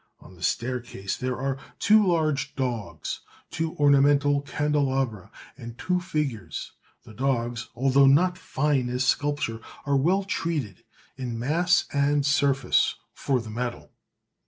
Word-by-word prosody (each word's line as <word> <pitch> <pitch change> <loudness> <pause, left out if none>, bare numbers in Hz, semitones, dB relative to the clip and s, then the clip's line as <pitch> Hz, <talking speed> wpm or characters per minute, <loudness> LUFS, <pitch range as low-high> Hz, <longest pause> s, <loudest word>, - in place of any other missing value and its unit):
On - - -15
the 85 - -17
staircase 120 -3 -2
there 130 0 -3
are 135 +1 -2 0.2
two 215 +1 +5
large 160 -6 0
dogs, 120 -5 -3 0.3
two 160 0 -3
ornamental 145 0 +4
candelabra, 135 -8 -1 0.3
and 120 0 -9
two 180 +5 0
figures; 150 - -3 0.3
the 110 - -13
dogs, 120 -1 -1
although 135 +2 +4
not 175 +7 +4
fine 145 -7 0
as 125 +1 -1
sculpture, 145 -4 0 0.3
are 140 -1 +1
well 180 +9 +2
treated, 155 - -3 0.3
in 125 -3 -4
mass 170 +9 +2
and 145 0 +2
surface, 140 -3 +2 0.2
for 135 -2 0
the 110 -2 -8
metal. 120 +2 -4
135 Hz, 130 wpm, -26 LUFS, 120-150 Hz, 0.3 s, two